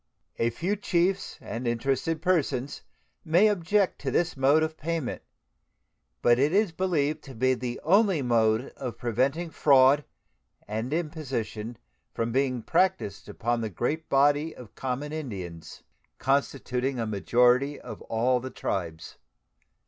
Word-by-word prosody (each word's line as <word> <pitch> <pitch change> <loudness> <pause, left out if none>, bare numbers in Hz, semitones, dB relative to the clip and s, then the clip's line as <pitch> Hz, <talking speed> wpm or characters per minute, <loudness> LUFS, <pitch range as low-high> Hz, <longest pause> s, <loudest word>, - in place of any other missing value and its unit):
A 115 - +2
few 175 - -2
chiefs 190 -1 0
and 115 +4 -5
interested 135 +7 -1
persons 145 -7 0 0.4
may 170 +6 +4
object 200 0 +1
to 140 - -2
this 175 +6 0
mode 140 +4 +4
of 160 0 -2
payment, 160 -4 -3 1.0
but 120 0 +5
it 145 +3 +3
is 200 0 +2
believed 155 -4 0
to 135 -3 -10
be 130 +3 +2
the 125 -1 -4
only 190 -2 +3
mode 115 0 +2
of 125 -3 -5
preventing 135 +8 -1
fraud 140 0 +5 0.6
and 110 +5 -3
imposition 135 -9 -3 0.4
from 115 0 -1
being 130 -2 0
practiced 185 - 0
upon 120 0 -1
the 110 - -2
great 150 - -3
body 145 +3 +3
of 120 -5 -12
common 135 +3 -4
Indians, 95 - -7 0.3
constituting 135 -1 0
a 115 - -1
majority 125 +6 +2
of - - -9
all 125 +3 +1
the 130 +2 -6
tribes. 85 -9 -4
135 Hz, 135 wpm, -27 LUFS, 120-160 Hz, 1.0 s, but